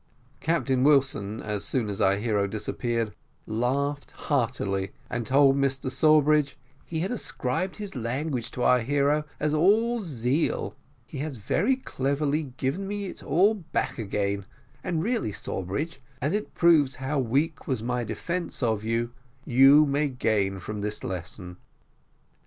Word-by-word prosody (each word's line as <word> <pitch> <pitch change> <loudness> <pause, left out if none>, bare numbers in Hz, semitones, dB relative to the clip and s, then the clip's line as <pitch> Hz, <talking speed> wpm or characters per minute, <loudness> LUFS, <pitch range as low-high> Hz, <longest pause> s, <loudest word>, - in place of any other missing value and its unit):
Captain 140 -6 +1
Wilson, 135 -7 +2
as 105 -2 -2
soon 125 -5 0
as 100 +1 -3
our 95 -1 +4
hero 105 -1 0
disappeared, 115 +2 -2 0.3
laughed 140 +6 -1 0.2
heartily, 100 -8 0 0.2
and 120 -2 -2
told 135 +1 +5
Mr 135 -1 0
Sawbridge 150 0 +4 0.3
"he 160 -1 -3
had 190 - -1
ascribed 185 - -2
his 205 -2 -6
language 125 +1 -2
to 125 - -4
our 125 - +5
hero 145 +4 +1
as 150 0 0
all 220 +9 +3
zeal. 140 - -1 0.3
He 135 - -8
has 145 -2 -4
very 205 - +1
cleverly 140 - -1
given 150 +10 -2
me 205 0 -3
it 190 - -8
all 195 +7 +3
back 170 - -3
again; 100 -2 -1 0.4
and 165 -3 -1
really, 230 - 0
Sawbridge, 100 - -4 0.2
as 145 +7 0
it 210 +1 -3
proves 155 -6 +4
how 135 +3 -2
weak 140 +6 0
was 130 -5 -1
my 125 0 -1
defence 170 - -3
of 110 -3 +1
you, 115 +1 -1 0.3
you 135 +4 +7
may 145 +1 +1
gain 105 -6 0
from 105 +3 -5
this 105 +1 -4
lesson." 90 0 -6
135 Hz, 145 wpm, -26 LUFS, 110-155 Hz, 0.4 s, you